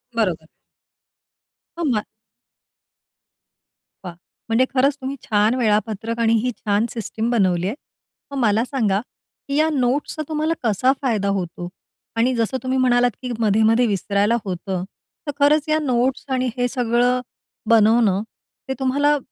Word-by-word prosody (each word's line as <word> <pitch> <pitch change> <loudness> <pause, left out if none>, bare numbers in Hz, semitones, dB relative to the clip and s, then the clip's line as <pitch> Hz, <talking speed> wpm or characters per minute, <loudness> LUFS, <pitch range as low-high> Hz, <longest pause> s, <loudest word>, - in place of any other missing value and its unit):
बरोबर. 180 -8 -1 1.3
हो. - - -1
मग? 240 -9 0 2.0
वा! 180 - -6 0.4
म्हणजे 230 +3 +3
खरंच 270 +2 +3
तुम्ही 265 +1 -4
छान 215 +2 +2
वेळापत्रक 220 -1 0
आणि 230 -1 +3
ही 250 - 0
छान 205 +1 0
सिस्टम 225 0 -3
बनवली 185 -6 +1
आहे. 210 - -3 0.6
मग 280 - -4
मला 220 -1 +3
सांगा, 220 -8 0 0.5
की 280 - -2
या 310 +2 +3
नोट्सचा 275 +3 0
तुम्हाला 310 +1 0
कसा 235 +3 +2
फायदा 220 -7 0
होतो? 175 0 -6 0.5
आणि 240 +3 +2
जसं 230 +3 0
तुम्ही 260 0 0
म्हणालात, 245 -1 +3
की 250 -2 -4
मधे-मधे 220 +2 +3
विसरायला 205 +2 +1
होतं, 185 0 -3 0.4
तर 290 - 0
खरंच 290 +1 +3
या 310 0 +3
नोट्स 255 -1 0
आणि 255 -1 0
हे 245 0 +1
सगळं, 245 0 +1 0.5
बनवणं. 220 -3 +4 0.5
ते - - 0
तुम्हाला 285 +3 +2
235 Hz, 135 wpm, -21 LUFS, 210-260 Hz, 2.0 s, बनवणं